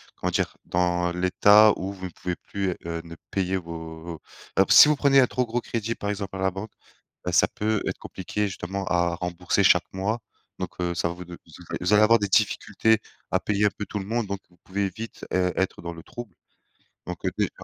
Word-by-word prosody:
comment - - -2
dire, - - -1
dans 90 0 +1
l'état 100 +4 +6
où 95 +2 -4
vous 95 -1 -8
ne - - -4
pouvez 90 0 -4
plus, 100 -1 -3 0.2
heu, 85 0 -3
ne 85 0 -10 0.2
payer 95 -1 0
vos 80 -1 -7 0.4
emp 95 - +6
si - - +10
vous 150 - +4
prenez 140 -1 +5
un 125 - +5
trop 125 -1 0
gros 120 +2 -1
crédit, 115 -1 -3
par 100 - -4
exemple, 100 -2 -4
à - - -6
la 95 - +3
banque, 95 +3 -7 0.5
bah 90 - -1
ça 85 - +5
peut 110 0 -1
être - - -2
compliqué 105 +3 -3
justement 95 +1 -4
à 85 0 +1
rembourser 90 0 -1
chaque - - +5
mois, 100 +5 -1 0.4
donc - - -3
heu 85 -1 -1
ça 85 - 0
vous 90 +1 -7
de 85 0 -9
z - - -14 0.2
vous 90 +3 +2
allez 105 +1 +7
avoir 115 +2 +6
des 100 - 0
difficultés 105 +2 +2 0.3
à - - +3
payer 105 0 +1
un - - +5
peu 105 - -3
tout 105 - -4
le 95 - -5
monde, 115 0 -1
donc 100 0 -3
vous 90 - -26
pouvez 100 +1 -1
vite, 115 +5 -8
heu, 90 -1 +2
être 95 - -1
dans 85 0 -5
le 80 -1 -11
trouble. 120 -6 -9 0.7
Donc - - -7
heu, - - +1
déjà - - +1
95 Hz, 225 wpm, -25 LUFS, 90-105 Hz, 0.7 s, si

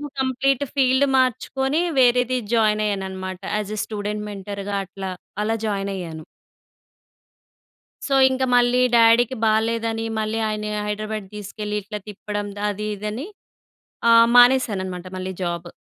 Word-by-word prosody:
So, - - -6 0.2
complete 265 +1 +1
field 265 0 +3
మార్చుకొని 265 +3 +1 0.2
వేరేది 250 0 +4 0.2
join 215 -2 +3
అయ్యానున్నమాట. 190 -2 -4 0.2
As 210 0 -3
a - - -5
student 210 0 -4
మెంటర్‌గా 200 0 -5
అట్లా 190 0 -6 0.3
అలా 225 +1 0
జాయిన్ 200 -1 -2
అయ్యాను. 160 -4 -7 1.8
సో 275 - 0 0.2
ఇంక 260 0 -1
మళ్ళీ 245 +1 +3 0.2
డ్యాడీకి 235 +2 +5
బాలేదని 225 +1 0 0.2
మళ్ళీ 215 +1 -2
ఆయన్ని 215 0 -3 0.2
హైడ్రాబాడ్ 215 0 -4
తీసుకెళ్ళి, 210 +1 -5
ఇట్లా 210 +2 -6
తిప్పడం 205 0 -5 0.2
అది 210 +1 -4
ఇదని 210 - -5 0.8
ఆహ్, 230 0 +7
మానేసానన్నమాట 205 -8 +3
మళ్ళీ 185 0 -4
జాబు. 175 0 -3
215 Hz, 120 wpm, -22 LUFS, 200-245 Hz, 1.8 s, ఆహ్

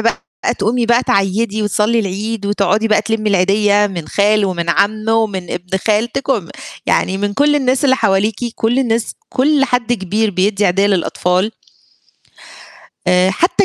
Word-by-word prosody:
بقى 230 +1 0 0.4
تقومي 235 +2 0
بقى 235 +1 +3
تعيّدي 205 +2 0
وتصلّي 210 +3 +1
العيد 205 +1 -3
وتقعدي 205 +2 +1
بقى 215 - +3
تلمّي 220 -1 -1
العيدية، 205 +2 +3
من 175 -6 -6
خالُه 205 +2 +2
ومن 170 -2 -3
عمه 215 +2 +1
ومن 205 -6 -1
ابن 180 +2 -3
خالتِك، 230 +6 0
وم 210 -11 0 0.4
يعني 190 +1 +1
من 205 0 -2
كُلّ 295 +2 +3
الناس 260 0 0
اللي 260 -1 +4
حواليكِ، 200 +1 +1 0.2
كُلّ 235 +4 0
الناس، 230 -3 -1
كُلّ 280 +2 +2
حد 245 -2 -1
كبير 215 +1 -1
بيدّي 200 +2 +1
عيدية 195 +3 +2
للأطفال. 185 0 0 1.6
آآ 180 +1 +3
حتّى 345 - +1
210 Hz, 150 wpm, -16 LUFS, 195-230 Hz, 1.6 s, اللي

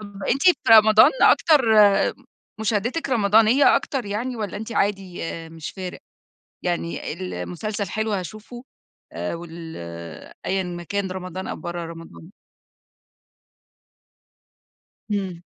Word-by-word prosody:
طَب 210 - -8
ما 195 - -6
أنتِ 275 - +1
في 360 -1 +6 0.2
رمضان 215 -1 +8
أكتر 260 -10 +5
آآ 205 -1 +5 0.5
مشاهدتِك 230 +8 -1
رمضانية 225 +3 +5
أكتر 270 -4 -3
يعني 235 +5 -3
والّا 205 -3 -4
أنتِ 220 +2 -6
عادي 195 -4 -1 0.3
مش 160 -1 -7
فارق، 185 -2 -7 0.7
يعني 170 -3 -3
المسلسل 190 +3 -5
حلو 220 +2 -2
هاشوفه 215 +6 -6 0.5
آآ - - -4
وال 165 -1 -9 0.7
أيًا 190 0 0
ما 175 -1 -6
كان 200 +1 -3
رمضان 185 0 -6
أو - - -4
برّا 175 0 -5
رمضان؟ 165 0 -11 2.8
إمم. 190 -4 -3
200 Hz, 115 wpm, -23 LUFS, 180-220 Hz, 2.8 s, رمضان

